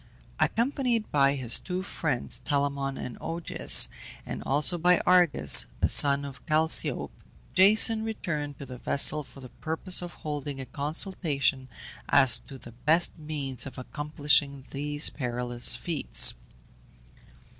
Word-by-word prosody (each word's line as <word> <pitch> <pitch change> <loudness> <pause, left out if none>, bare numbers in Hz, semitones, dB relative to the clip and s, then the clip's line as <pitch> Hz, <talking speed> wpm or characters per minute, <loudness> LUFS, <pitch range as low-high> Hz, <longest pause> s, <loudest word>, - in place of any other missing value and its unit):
Accompanied 240 -2 -2
by 140 -1 +1
his 125 -4 +3
two 185 0 -6
friends, 150 -9 -3
Telamon 140 -2 -3
and 125 - -9
Augeas, 165 - +3 0.4
and - - -7
also 150 +5 +1
by 180 +1 +2
Argus, 180 -3 +4
the - - 0
son 140 0 +4
of 135 -2 -12
Chalciope, 160 0 +1 0.4
Jason 220 +3 +4
returned 150 -10 -6
to 140 - -10
the 125 -2 -11
vessel 150 +3 +1
for 135 - -17
the 130 - -12
purpose 165 +4 0
of 175 -1 -9
holding 145 -3 -7
a 135 - -7
consultation 140 - -3 0.4
as 135 -2 +5
to 135 - -14
the 120 - -14
best 155 +9 0
means 145 -4 -6
of 130 - -12
accomplishing 145 0 -2
these 145 +2 0
perilous 120 -2 +1
feats. 120 - +3
145 Hz, 130 wpm, -26 LUFS, 135-170 Hz, 0.4 s, as